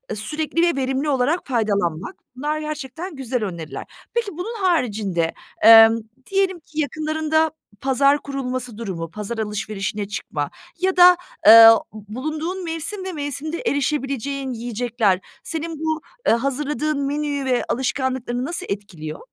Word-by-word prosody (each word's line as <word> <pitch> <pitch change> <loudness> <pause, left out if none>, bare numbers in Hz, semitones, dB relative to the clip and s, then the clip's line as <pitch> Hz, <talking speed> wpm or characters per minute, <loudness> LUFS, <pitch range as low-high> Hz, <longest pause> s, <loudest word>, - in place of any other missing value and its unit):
sürekli 305 +9 -2
ve 345 -1 +3
verimli 265 +3 -1
olarak 280 +5 +1
faydalanmak. 205 - -1 0.2
Bunlar 300 +4 -2
gerçekten 305 +3 -6
güzel 255 -3 -2
öneriler. 170 -6 -5 0.3
Peki, 465 -3 -1
bunun 440 +7 -4
haricinde, 210 - 0 0.3
emm, 225 0 +9 0.3
diyelim 385 -2 +1
ki 315 -1 -8
yakınlarında 310 +2 0 0.3
pazar 275 +2 +3
kurulması 255 -4 -4
durumu, 180 -7 -5
pazar 210 +4 -5
alışverişine 210 -1 -3
çıkma 150 -7 -4 0.3
ya 370 +1 0
da, 360 0 +8 0.3
eee, 225 +1 +11 0.3
bulunduğun 305 - -5
mevsim 335 +4 -2
ve 380 - -3
mevsimde 295 +2 -3
erişebileceğin 275 - -1
yiyecekler 230 -4 0 0.2
senin 325 -1 -4
bu, 315 0 -1 0.3
eee, - - +6
hazırladığın 290 +4 -1
menüyü 290 -1 -2
ve 250 -2 +1
alışkanlıklarını 260 -1 -1
nasıl 340 +4 -2
etkiliyor? 180 -6 -6
270 Hz, 125 wpm, -22 LUFS, 225-310 Hz, 0.3 s, eee